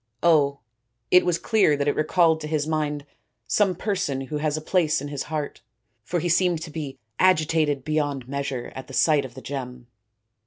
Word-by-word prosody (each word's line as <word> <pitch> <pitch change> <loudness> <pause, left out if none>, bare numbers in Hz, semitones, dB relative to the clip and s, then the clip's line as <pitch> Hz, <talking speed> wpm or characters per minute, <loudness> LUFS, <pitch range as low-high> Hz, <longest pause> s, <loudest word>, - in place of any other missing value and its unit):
" - - -43
Oh, 145 -4 +3 0.5
it 180 0 +6
was 175 -2 +2
clear 200 -10 +3
that 140 0 -1
it 145 - +3
recalled 160 +1 +3
to 150 - -4
his 150 -1 0
mind 150 -2 -2 0.4
some 195 -3 +2
person 180 -9 -1
who 140 +3 -4
has 150 0 0
a - - -2
place 160 -1 +1
in 145 +1 -6
his 145 -2 -4
heart; 155 -2 -4 0.4
for 175 - -1
he 175 - -2
seemed 170 -1 +2
to 160 - -8
be 145 -4 -6 0.2
agitated 155 -5 +2
beyond 145 -4 -1
measure 140 -2 -4
at 130 - -8
the 135 - -8
sight 150 -4 +3
of 125 -2 -11
the 130 - -9
gem." 125 -3 -6
150 Hz, 195 wpm, -24 LUFS, 140-165 Hz, 0.5 s, it